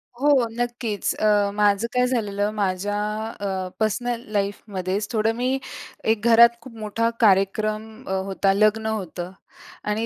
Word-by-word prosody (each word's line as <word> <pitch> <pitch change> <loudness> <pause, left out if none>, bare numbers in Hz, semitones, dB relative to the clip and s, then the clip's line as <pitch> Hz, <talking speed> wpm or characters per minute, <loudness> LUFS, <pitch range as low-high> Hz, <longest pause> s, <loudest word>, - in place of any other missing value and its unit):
हो, 270 -1 +3
नक्कीच 240 -3 -2
अ, 205 -1 +2
माझं 205 +1 +2
काय 250 0 +3
झालेलं, 210 -4 -1
माझ्या 200 0 -1 0.4
अ, 190 -2 -2
पर्सनल 230 +2 -1
लाईफमध्येच 200 -1 -2
थोडं 225 -1 +1
मी 255 +2 0 0.5
एक 220 -2 0
घरात 235 +1 +8
खूप 235 0 -12
मोठा 225 +2 0
कार्यक्रम 215 +1 +1
अ, - - -4
होता. 195 0 +1
लग्न 215 +2 +2
होतं. 185 -4 -4 0.5
आणि 210 +2 -1
215 Hz, 130 wpm, -23 LUFS, 200-230 Hz, 0.5 s, घरात